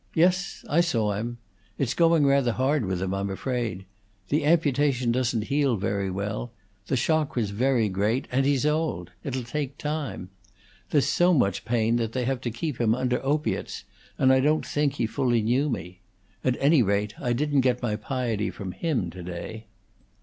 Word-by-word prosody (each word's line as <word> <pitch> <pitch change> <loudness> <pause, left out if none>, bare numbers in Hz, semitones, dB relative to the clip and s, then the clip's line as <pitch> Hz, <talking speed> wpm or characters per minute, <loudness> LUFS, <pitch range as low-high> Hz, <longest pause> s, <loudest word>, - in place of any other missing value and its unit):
"Yes, 185 +4 +1
I 165 +3 +3
saw 115 -11 +1
him. 115 +4 -4 0.4
It's 130 -4 0
going 165 -3 +4
rather 140 -4 +3
hard 135 0 +1
with 95 -1 -2
him, 95 0 -2
I'm 100 0 -2
afraid. 110 -2 -3 0.4
The 150 +1 +1
amputation 145 -6 +2
doesn't 120 -2 0
heal 140 0 +1
very 100 -1 -1
well; 100 +5 -3 0.4
the 130 - +1
shock 155 +3 +1
was 110 -5 0
very 120 +1 +2
great, 105 +7 0
and 135 +2 +2
he's 140 0 +2
old. 150 - -1
It'll 130 -2 -3
take 140 +2 -4
time. 150 -11 -4 0.6
There's 145 -3 +3
so 175 +4 +3
much 100 -8 +1
pain 115 0 +1
that 115 -1 -2
they 125 -2 -1
have 130 -1 -1
to 125 - -2
keep 120 +3 -4
him 115 -1 +3
under 125 0 -1
opiates, 150 +3 -1 0.3
and 130 0 +5
I 130 - +4
don't 150 +4 +2
think 145 -1 0
he 120 - -1
fully 120 -1 +1
knew 130 +7 +2
me. 90 -7 -5 0.4
At 130 -1 +1
any 145 0 +5
rate, 105 0 0
I 120 - 0
didn't 145 +2 +2
get 125 -1 +1
my 110 -3 0
piety 115 -1 -2
from 95 -3 -6
him 120 - -1
to 90 - -9
day." 90 +6 -7
125 Hz, 180 wpm, -26 LUFS, 110-145 Hz, 0.6 s, and